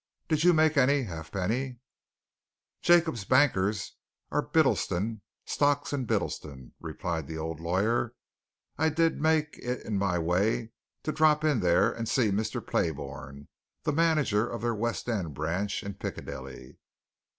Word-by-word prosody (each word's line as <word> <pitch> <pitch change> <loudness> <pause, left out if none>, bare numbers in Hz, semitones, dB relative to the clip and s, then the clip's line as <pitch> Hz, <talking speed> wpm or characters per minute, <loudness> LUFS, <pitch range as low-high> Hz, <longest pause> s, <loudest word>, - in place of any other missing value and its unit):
Did 155 -2 +1
you 180 - +7
make 155 -2 +3
any, 140 +1 +4
Halfpenny?" 100 - -3 1.0
"Jacob's 165 -10 +4
bankers 105 -6 +2 0.3
are - - +2
Bittleston, 105 +4 +1 0.2
Stocks 145 0 +1
and 130 -4 -2
Bittleston," 65 - -3
replied 80 -4 -4
the 80 - -5
old 80 0 -4
lawyer. 110 +8 0 0.6
"I 160 +1 +4
did 165 +1 +1
make 155 -1 +1
it 125 0 -4
in 105 -3 -1
my 95 -3 +1
way 100 +7 +1 0.3
to 155 - -1
drop 155 -1 +3
in 150 -6 +3
there 90 0 +3
and 115 -1 -4
to - - -1
see 115 -6 +3
Mr. 105 +3 -2
Playbourne, 70 -3 -3 0.4
the 155 -2 0
manager 150 -9 +2
of 120 -1 -5
their 120 0 +1
West 115 +3 -2
End 95 - -2
branch, 90 +8 -2
in 100 -1 -5
Piccadilly. 65 -8 -7
115 Hz, 140 wpm, -29 LUFS, 90-145 Hz, 1.0 s, you